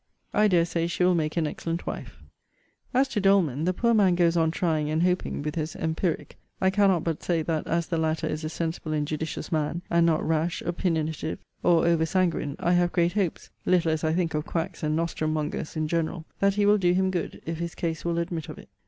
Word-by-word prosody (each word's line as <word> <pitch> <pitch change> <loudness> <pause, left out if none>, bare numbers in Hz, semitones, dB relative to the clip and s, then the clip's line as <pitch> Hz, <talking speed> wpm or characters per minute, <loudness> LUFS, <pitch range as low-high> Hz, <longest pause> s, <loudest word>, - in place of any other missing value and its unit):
] - - -41
I 215 - +6
dare 175 -4 +4
say 170 0 -1
she 175 +1 -1
will 180 0 +5
make 155 -1 -1
an 165 - +2
excellent 165 +3 -4
wife. - - -7 0.7
As 265 +2 +3
to 215 -5 -1
Doleman, 175 -7 +3
the 180 - +3
poor 235 +5 +1
man 195 -5 +4
goes 170 -1 +3
on 165 -1 +3
trying 160 -3 0
and 155 +2 +1
hoping 180 -5 0
with 150 0 -2
his 155 0 -3
empiric. 160 +1 -2 0.2
I 190 0 +3
cannot 190 -4 +3
but 165 -3 -2
say 165 -3 0
that 160 -1 -2
as 170 0 0
the 165 0 -2
latter 160 0 0
is 155 +1 -3
a 155 - -2
sensible 160 -1 -3
and 150 -1 0
judicious 160 +3 -4
man, 160 +2 -1
and 170 0 +4
not 165 -2 +2
rash, 160 +1 0
opinionative, 160 -3 -1 0.2
or 170 -1 +4
over 165 -1 +3
sanguine, 170 -5 0
I 175 - 0
have 175 0 +3
great 170 0 +2
hopes 195 -5 -2
(little 175 -3 +3
as 155 -1 -1
I 160 - +2
think 170 -1 0
of 150 0 -1
quacks 165 +1 -3
and 155 0 0
nostrum 160 -1 -1
mongers 155 +1 -3
in 155 -1 -1
general) 165 0 -2
that 200 0 +3
he 205 -1 +2
will 205 +1 +5
do 175 -2 +3
him 190 +1 +2
good, 175 -3 -3
if 165 0 -4
his 170 -1 -4
case 165 -2 -3
will 170 -1 -1
admit 170 -2 -3
of - - -7
it. - - -13
165 Hz, 230 wpm, -26 LUFS, 160-180 Hz, 0.7 s, I